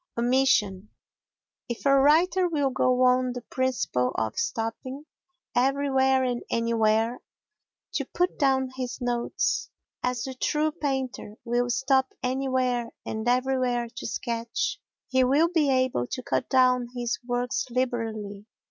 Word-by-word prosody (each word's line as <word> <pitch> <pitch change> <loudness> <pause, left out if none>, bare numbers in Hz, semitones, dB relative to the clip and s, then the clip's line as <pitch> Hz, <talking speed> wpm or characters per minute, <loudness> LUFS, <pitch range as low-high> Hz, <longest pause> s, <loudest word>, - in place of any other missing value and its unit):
Omission 235 -5 +2 0.8
If 240 - -5
a 275 - +5
writer 325 +7 +4
will 290 -4 0
go 255 0 +2
on 255 0 +3
the 245 -1 -7
principle 250 - -1
of 110 -1 -1
stopping 255 +5 -3 0.5
everywhere 265 0 +2
and 245 -1 -1
anywhere 230 0 +1 0.7
to - - -1
put 360 +1 -1
down 265 -2 +2
his 255 -1 -4
notes, 245 +11 -1 0.3
as 250 -2 -1
the 265 - -5
true 300 +4 0
painter 265 -7 -3
will 245 +1 0
stop 265 +1 +1
anywhere 255 -2 0 0.2
and 220 +1 -4
everywhere 250 -1 +1
to - - -4
sketch, 235 -1 -3 0.3
he 260 -1 +3
will 285 +6 +3
be 320 -5 +2
able 255 - +1
to 255 - -5
cut 250 - -1
down 255 -2 +3
his 240 0 -2
works 245 +1 -1
liberally. 225 -5 -3
255 Hz, 130 wpm, -26 LUFS, 235-265 Hz, 0.8 s, a